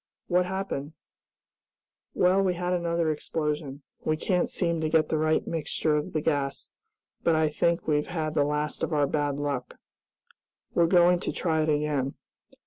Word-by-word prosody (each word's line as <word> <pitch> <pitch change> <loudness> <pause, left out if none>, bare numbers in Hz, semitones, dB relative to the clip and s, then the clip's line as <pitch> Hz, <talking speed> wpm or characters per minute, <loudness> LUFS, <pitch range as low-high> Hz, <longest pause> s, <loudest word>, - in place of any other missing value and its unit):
"What 180 0 +2
happened?" 185 -6 -4 1.2
"Well, 185 +2 +4
we 185 -2 +1
had 180 +1 -1
another 170 -2 0
explosion. 150 -2 -3 0.2
We 155 - 0
can't 180 +2 0
seem 170 -3 0
to 155 - 0
get 155 -1 +3
the 155 - +1
right 155 0 +2
mixture 155 -1 -1
of 150 - -2
the 155 - 0
gas, 140 -3 -1 0.5
but 165 - +3
I 155 -1 +3
think 170 +3 0
we've 150 -1 +1
had 155 -3 -2
the 145 - +3
last 150 0 -2
of - - -1
our 145 -1 +3
bad 145 0 -1
luck. 140 -3 -3 1.0
We're 170 -1 +4
going 175 0 +5
to - - -3
try 160 -3 0
it 155 - 0
again. 145 -3 0
155 Hz, 165 wpm, -27 LUFS, 150-170 Hz, 1.2 s, going